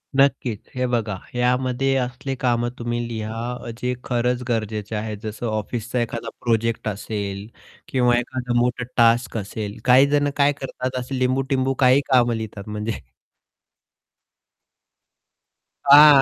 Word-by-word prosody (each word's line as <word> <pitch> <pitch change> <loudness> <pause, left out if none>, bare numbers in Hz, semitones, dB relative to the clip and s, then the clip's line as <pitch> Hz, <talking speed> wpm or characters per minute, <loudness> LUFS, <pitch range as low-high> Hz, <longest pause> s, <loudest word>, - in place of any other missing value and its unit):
नक्कीच. 135 -5 +2 0.2
हे 125 0 0
बघा 110 -5 -1
ह्यामध्ये 125 +2 0
असले 130 +1 -3
कामं 120 -1 +1
तुम्ही 120 0 -2
लिहा 110 0 -4 0.2
अ, - - -5
जे 125 0 0
खरंच 125 0 0
गरजेचे 110 -1 -2
आहे, 105 0 -3
जसे 110 +2 -5
ऑफिसचा 115 +3 -2
एखादा 115 0 -3
प्रोजेक्ट 115 -1 0
असेल 100 -1 -4 0.4
किंवा 125 -2 +3
एखादा 125 0 -3
मोठा 120 0 0
टास्क 115 0 +4
असेल, 105 0 -5
काही 130 +2 +7
जण 145 0 +2
काय 145 0 +5
करतात 130 -1 -3
असे 130 +1 -4
लिंबू-टिंबू 130 +1 +1
काही 130 +2 +5
कामं 120 -2 +4
लिहितात 110 -2 -6
म्हणजे 105 +1 -3 2.9
हां, 145 0 +9
120 Hz, 125 wpm, -22 LUFS, 110-130 Hz, 2.9 s, हां